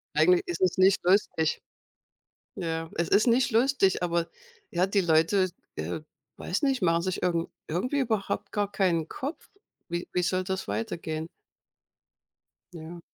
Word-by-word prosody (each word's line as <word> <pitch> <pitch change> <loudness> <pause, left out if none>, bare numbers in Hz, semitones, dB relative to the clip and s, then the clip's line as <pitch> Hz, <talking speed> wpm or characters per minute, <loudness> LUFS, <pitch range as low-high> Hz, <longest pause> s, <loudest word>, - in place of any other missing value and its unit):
Eigentlich 365 0 +5
ist 355 - -4
es 185 0 +2
nicht 190 +1 +4
lustig. 175 -4 +2 0.9
Ja, 165 -1 -3
es 170 0 -1
ist 215 +5 +4
nicht 240 +1 +3
lustig, 225 -6 +3
aber, 170 -1 0 0.4
ja, 180 +1 +2
die 200 0 +2
Leute, 175 +3 +3 0.3
äh, 85 - -4 0.4
weiß 180 - -2
nicht, 270 -5 +2
machen 170 -1 +3
sich 185 +1 -2
irgend 170 -1 0 0.2
irgendwie 250 - -1
überhaupt 220 -6 -1
gar 205 -1 -1
keinen 170 -5 +1
Kopf. 280 +5 -6 0.4
Wie 175 0 -3
wie 180 - +1
soll 185 +2 +1
das 190 - -3
weitergehen? 155 +9 -3 1.5
Ja. 170 0 -9
180 Hz, 140 wpm, -27 LUFS, 165-205 Hz, 1.5 s, Eigentlich